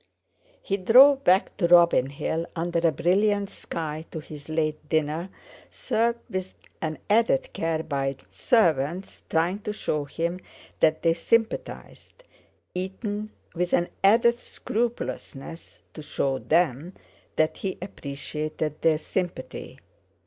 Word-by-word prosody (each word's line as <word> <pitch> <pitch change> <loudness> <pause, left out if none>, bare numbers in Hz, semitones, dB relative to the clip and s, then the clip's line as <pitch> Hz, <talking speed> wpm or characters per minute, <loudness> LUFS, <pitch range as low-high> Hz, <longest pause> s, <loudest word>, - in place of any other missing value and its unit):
He 195 - -1
drove 265 +8 +7
back 185 +2 +3
to 175 - +2
Robin 170 -6 +5
Hill 160 +3 -3
under 170 0 0
a 165 -1 +3
brilliant 200 +6 +1
sky 155 -2 -5
to 160 - -6
his 150 -1 -11
late 155 -1 -2
dinner, 160 +3 0 0.4
served 235 +1 0
with 185 -4 -5 0.3
an 155 -1 -2
added 230 +5 +2
care 165 -1 -1
by 135 -3 -2 0.2
servants 170 - +1
trying 170 +5 +1
to 210 - -4
show 150 -8 -2
him 170 +5 -3 0.4
that 155 0 +3
they 165 -1 +4
sympathised, 225 - -2 0.5
eaten 205 +3 -4 0.2
with 175 0 -2
an 175 - +2
added 235 +4 +5
scrupulousness 215 - -5
to 155 - -8
show 135 -2 -1
them 165 +1 +1 0.4
that 155 0 +1
he 190 -2 -3
appreciated 150 -2 -5
their 160 -2 +4
sympathy. 175 +2 -4
170 Hz, 120 wpm, -26 LUFS, 155-200 Hz, 0.5 s, drove